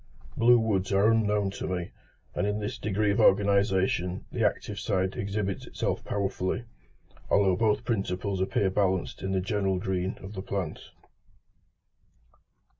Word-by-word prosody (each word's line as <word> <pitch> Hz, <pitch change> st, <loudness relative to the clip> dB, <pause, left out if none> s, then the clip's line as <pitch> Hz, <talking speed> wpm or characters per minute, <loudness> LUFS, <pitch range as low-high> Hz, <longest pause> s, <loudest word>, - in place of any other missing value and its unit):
Blue 120 Hz, +1 st, +6 dB
woods 105 Hz, -4 st, 0 dB
are 100 Hz, +3 st, +4 dB
unknown 105 Hz, -3 st, +1 dB
to -, -, -5 dB
me; 90 Hz, -2 st, -3 dB, 0.4 s
and -, -, -1 dB
thus -, -, +2 dB
in 105 Hz, -, -3 dB
this 105 Hz, -1 st, -4 dB
degree 105 Hz, 0 st, +1 dB
of 100 Hz, -, 0 dB
organisation 95 Hz, -2 st, +2 dB
the -, -, -1 dB
active 105 Hz, -1 st, -1 dB
side 95 Hz, -3 st, 0 dB
exhibits 100 Hz, -1 st, -3 dB
itself -, -, -2 dB
powerfully, 100 Hz, +1 st, -2 dB, 0.7 s
although 95 Hz, -2 st, +4 dB
both 105 Hz, +2 st, +1 dB
principles 95 Hz, -4 st, -1 dB
appear 95 Hz, 0 st, +1 dB
balanced 95 Hz, -2 st, 0 dB
in 95 Hz, -, -2 dB
the 95 Hz, -1 st, +1 dB
general 95 Hz, -1 st, 0 dB
green 95 Hz, -1 st, -2 dB
of 95 Hz, +2 st, -8 dB
the 95 Hz, -, -5 dB
plant. 95 Hz, -5 st, -4 dB
100 Hz, 145 wpm, -28 LUFS, 95-105 Hz, 0.7 s, Blue